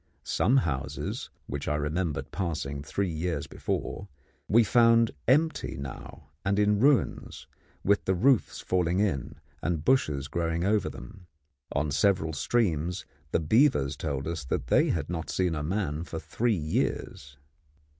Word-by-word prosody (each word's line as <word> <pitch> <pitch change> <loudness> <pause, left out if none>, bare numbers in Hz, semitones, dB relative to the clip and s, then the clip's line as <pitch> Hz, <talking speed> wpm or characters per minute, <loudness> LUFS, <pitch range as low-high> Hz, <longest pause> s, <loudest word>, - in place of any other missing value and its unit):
Some 130 +4 +2
houses, 70 - -2 0.2
which 70 +1 -5
I 75 - +1
remembered 75 -1 -2
passing 80 -7 -3
three 95 +5 -2
years 80 -2 -2
before, 100 - -4 0.4
we 115 +3 +5
found 115 +1 +5 0.2
empty 155 +6 +2
now 70 +1 -9
and 100 +1 +1
in 105 0 +3
ruins, 140 +2 +1 0.4
with 100 +1 +2
the 95 - +2
roofs 125 +5 +2
falling 90 -1 +1
in 95 -11 0 0.3
and 80 -3 -2
bushes 75 - +2
growing 85 +1 -1
over 105 +2 +2
them. 95 -4 -11 0.5
On 75 +1 0
several 80 +2 +2
streams 90 0 0 0.2
the - - +1
beavers 80 - +3
told 70 -2 -3
us 80 -3 -3
that - - -3
they - - +4
had 80 -4 -1
not 80 -2 -4
seen 90 -3 0
a 75 - -2
man 80 -2 -2
for 80 - -6
three 105 +9 0
years. 70 -3 -2
85 Hz, 145 wpm, -28 LUFS, 75-105 Hz, 0.5 s, we